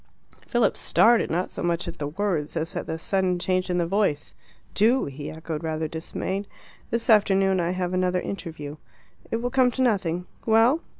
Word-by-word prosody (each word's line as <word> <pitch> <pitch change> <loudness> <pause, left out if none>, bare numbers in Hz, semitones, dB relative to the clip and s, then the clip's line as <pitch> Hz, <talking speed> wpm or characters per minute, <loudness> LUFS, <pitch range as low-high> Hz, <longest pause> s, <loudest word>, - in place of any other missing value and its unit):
Philip 240 -4 +2
started, 235 0 +4
not 175 +3 -1
so - - -5
much 170 0 0
at 170 - -7
the 145 - -2
words 165 -2 -2
as 160 +2 -3
at - - -4
the 160 - -3
sudden 185 +1 0
change 185 +1 0
in 180 - +1
the 175 - +1
voice. 190 -5 0 0.4
"Do?" 235 +6 +3
he 145 +1 -6
echoed, 160 0 -6
rather 160 0 -2
dismayed. 190 +5 -4 0.4
"This 230 0 -1
afternoon 195 -3 +4
I 170 -1 0
have 180 0 -2
another 185 0 +1
interview." 160 -6 -6 0.5
"It - - -1
will 245 - -1
come 260 -1 +4
to 260 - -3
nothing. 180 -7 0 0.2
Well?" 230 +8 +4
185 Hz, 180 wpm, -25 LUFS, 165-210 Hz, 0.5 s, started